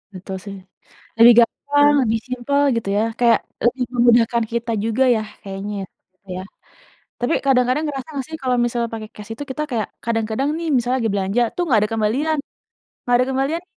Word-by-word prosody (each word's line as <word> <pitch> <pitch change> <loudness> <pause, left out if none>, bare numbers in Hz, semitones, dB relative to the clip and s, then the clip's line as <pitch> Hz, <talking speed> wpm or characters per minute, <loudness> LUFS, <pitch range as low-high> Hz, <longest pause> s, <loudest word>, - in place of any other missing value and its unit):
Betul 190 +1 -7
sih, 200 -1 -7 0.6
lebih 235 +1 +9
gampang 290 +5 +3
lebih 225 -1 0
simple 255 +3 0
gitu 220 -4 -2
ya, 215 - +2 0.2
kayak 235 -2 +4 0.2
lebih 250 +2 +1
memudahkan 235 -1 +4
kita 235 0 -2
juga 230 +4 +1
ya, 215 - -1 0.2
kayaknya, 200 +1 -5
ya, - - -6 0.4
Kak 190 - -11
ya. 185 - -5 0.8
Tapi 245 +6 0
kadang-kadang 255 +2 +2
ngerasa 275 0 -5
nggak 270 -2 -3
sih 320 - -6
kalau 255 -1 +1
misalnya 235 -1 -1
pakai 215 -1 -6
cash 210 +1 -10
itu 290 - -6
kita 300 +3 -3
kayak 220 -4 -1 0.2
kadang-kadang 225 +4 -1
nih 335 -1 -4
misalnya 250 +1 +1
lagi 220 - +1
belanja 200 +4 0
tuh, 355 - 0
"Nggak 230 -6 +4
ada 210 - -1
kembalian 260 +9 0 0.7
nggak 245 0 +3
ada 250 +1 +2
kembalian 275 +6 -1
240 Hz, 185 wpm, -20 LUFS, 220-265 Hz, 0.8 s, lebih